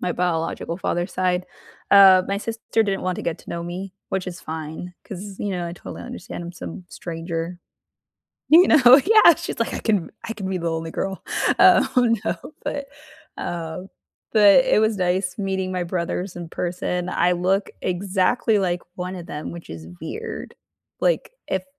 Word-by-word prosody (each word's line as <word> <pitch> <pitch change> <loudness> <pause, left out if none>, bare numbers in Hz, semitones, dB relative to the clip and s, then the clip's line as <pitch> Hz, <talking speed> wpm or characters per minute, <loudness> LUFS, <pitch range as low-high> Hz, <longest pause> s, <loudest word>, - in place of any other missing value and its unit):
my 180 - -1
biological 165 -1 -2
father's 175 0 -2
side. 180 -1 0 0.5
Uh, 190 -2 +8
my 200 - 0
sister 225 0 -1
didn't 195 -1 -1
want 185 -1 -1
to - - -5
get 170 -1 -2
to - - -12
know 170 0 -4
me, 185 +2 -6 0.2
which 190 -1 -2
is 175 - -8
fine 160 +3 -6
'cause, 195 0 -8
you 205 - -2
know, 180 -2 -2
I 170 - -5
totally 175 - -9
understand 175 - -7
I'm 175 - -7
some 175 +1 -8
stranger. 165 +1 -5 0.9
You 340 +4 +7
know? 265 -2 +8
Yeah. 430 -6 +7
She's, - - -6
like, 230 - -1
"I - - -3
can 205 -7 0
I 225 - -4
can 200 -4 -5
be 190 - -1
the 170 -1 -2
only 165 0 -4
girl." 195 0 -3 0.4
Oh, 245 -3 +5
no, - - 0 0.3
but, 280 -1 -3 0.5
um, 170 +2 -5 0.4
but 210 +3 +7
it 260 - +3
was 220 0 +2
nice 180 0 0
meeting 190 -2 -2
my 180 -1 -1
brothers 175 +1 -3
in 175 -2 -6
person. 180 +1 -3
I 180 -1 +2
look 185 +3 0
exactly 195 +5 +1
like 180 -2 -1
one 180 +1 -5
of 175 -2 -8
them, 150 +1 -6
which 170 -1 -10
is 80 0 -8
weird. 450 +1 -6 0.5
Like, - - +1 0.2
if - - -1
185 Hz, 175 wpm, -23 LUFS, 175-200 Hz, 0.9 s, Uh